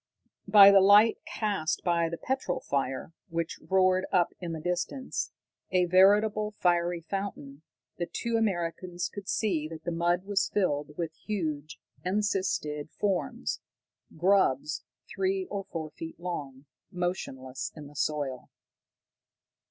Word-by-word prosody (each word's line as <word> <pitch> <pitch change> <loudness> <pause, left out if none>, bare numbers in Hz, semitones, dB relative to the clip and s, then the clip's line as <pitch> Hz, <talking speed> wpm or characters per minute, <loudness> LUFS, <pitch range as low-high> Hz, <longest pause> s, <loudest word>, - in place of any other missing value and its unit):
By 200 -1 +9
the 195 -1 +7
light 205 +3 +6
cast 195 -7 -1
by 170 -2 +2
the 170 - -4
petrol 260 -7 -2
fire, 135 +3 -2 0.2
which 165 0 -3
roared 185 0 +3
up 175 -2 +2
in 175 -2 -5
the 160 - -4
distance, 180 - -2 0.4
a 180 -1 +3
veritable 205 +4 +4
fiery 175 -1 +2
fountain, 160 -6 -5 0.4
the 175 - -2
two 235 +7 -2
Americans 180 -4 -1
could 200 -1 -8
see 170 -9 0
that 160 0 -9
the 175 - -2
mud 175 +2 +1
was 200 0 0
filled 150 -7 0
with 165 -2 -3
huge 155 -6 -4 0.2
encysted 185 -6 -1
forms, 195 -1 -2 0.6
grubs 170 -4 +2 0.2
three 190 0 -1
or 200 -1 -3
four 160 -2 -5
feet 165 +2 -8
long, 145 -6 -5 0.3
motionless 135 -8 -3
in 150 -2 -9
the 145 +1 -13
soil. 145 -3 -2
175 Hz, 130 wpm, -29 LUFS, 155-195 Hz, 0.6 s, By